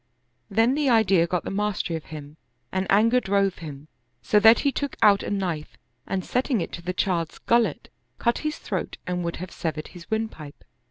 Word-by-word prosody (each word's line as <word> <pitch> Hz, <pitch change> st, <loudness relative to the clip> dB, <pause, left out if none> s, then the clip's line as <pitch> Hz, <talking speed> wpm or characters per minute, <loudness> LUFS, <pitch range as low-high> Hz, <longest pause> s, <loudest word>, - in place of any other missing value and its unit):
Then 225 Hz, +5 st, +3 dB
the 290 Hz, -1 st, +1 dB
idea 195 Hz, -7 st, +4 dB
got 180 Hz, 0 st, -1 dB
the -, -, -4 dB
mastery 200 Hz, -4 st, -1 dB
of 160 Hz, -, -6 dB
him 150 Hz, -1 st, -9 dB, 0.3 s
and 190 Hz, 0 st, -1 dB
anger 230 Hz, +5 st, +5 dB
drove 195 Hz, -3 st, +1 dB
him, 150 Hz, -3 st, -9 dB, 0.4 s
so 210 Hz, -, +4 dB
that 225 Hz, +2 st, +7 dB
he 280 Hz, -, +2 dB
took 285 Hz, 0 st, -3 dB
out 200 Hz, -1 st, +6 dB
a -, -, -4 dB
knife 180 Hz, -7 st, -3 dB, 0.3 s
and 190 Hz, -1 st, -2 dB
setting 250 Hz, -1 st, 0 dB
it 170 Hz, -, -3 dB
to 175 Hz, -, -7 dB
the 180 Hz, +1 st, -3 dB
child's 175 Hz, -3 st, -1 dB
gullet, 235 Hz, 0 st, +1 dB, 0.3 s
cut 235 Hz, 0 st, +1 dB
his 305 Hz, 0 st, -3 dB
throat -, -, -4 dB
and 180 Hz, -1 st, -2 dB
would 170 Hz, 0 st, -2 dB
have 185 Hz, 0 st, -7 dB
severed 155 Hz, -2 st, -4 dB
his 175 Hz, -2 st, -13 dB
windpipe. 220 Hz, -10 st, -4 dB
195 Hz, 195 wpm, -25 LUFS, 170-225 Hz, 0.4 s, that